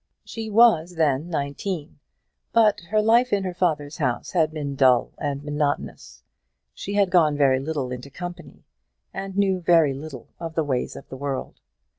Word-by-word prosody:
She 225 -1 -6
was 205 -6 +4
then 155 0 +1
nineteen; 155 +2 -4 0.5
but 215 -3 +4
her 215 +1 +2
life 235 +3 +4
in 200 -1 +1
her 185 -1 -3
father's 155 -5 -1
house 125 -6 -2
had 160 -4 +2
been 145 -3 -4
dull 130 -3 +4
and 145 -1 -3
monotonous; 150 -1 -3 0.5
she 200 - -5
had 200 -3 +2
gone 155 -5 +4
very 135 -2 +3
little 140 -3 -3
into 125 +2 -7
company, 175 +4 -9 0.5
and 195 0 -6
knew 195 -2 +2
very 165 -5 +4
little 135 -3 -9
of 165 -1 -6
the 160 - +1
ways 130 -4 -2
of - - -11
the 130 - -8
world. 140 -1 -4
155 Hz, 165 wpm, -24 LUFS, 140-190 Hz, 0.5 s, was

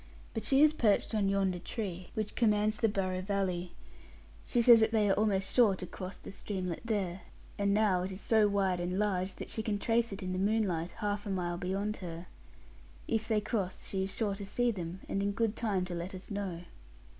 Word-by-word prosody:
But 225 - -3
she 275 +2 +5
is 305 0 +6
perched 225 -6 +2
on 205 -3 +2
yonder 195 -2 +1
tree, 185 -2 -5
which 215 -1 -2
commands 215 -1 +2
the 225 - +2
Barrow 185 -2 -1
valley. 185 -3 -2 0.7
She 245 - +1
says 235 -1 +8
that 220 0 +3
they 215 -2 +3
are 195 - +4
almost 195 -2 +1
sure 225 -6 +5
to 185 - -6
cross 185 +2 -7
the - - -10
streamlet 185 -4 -4
there; 195 -5 -2 0.4
and 200 0 +2
now 200 -3 +3
it 185 +2 -3
is 190 - -6
so 220 -1 +4
wide 195 -3 +1
and 180 +1 -2
large, 195 -2 0
that - - -7
she 220 - -2
can 215 -2 -1
trace 230 +2 +1
it 195 0 -6
in 185 0 -2
the 185 - -2
moonlight, 195 -5 +1
half 205 +1 -3
a - - -3
mile 175 -2 -2
beyond 200 +4 -2
her. 170 -1 -7 0.8
If 220 -1 0
they 215 -2 +2
cross, 200 -4 -3
she 190 - -2
is 190 0 -2
sure 210 -3 0
to 200 +1 -6
see 240 +4 +1
them, 180 -2 -6
and 195 - -1
in 200 0 0
good 225 +1 0
time 200 -5 0
to 180 - -6
let 175 +3 -4
us 185 +3 -9
know.' 195 -4 -3
200 Hz, 215 wpm, -32 LUFS, 185-215 Hz, 0.8 s, says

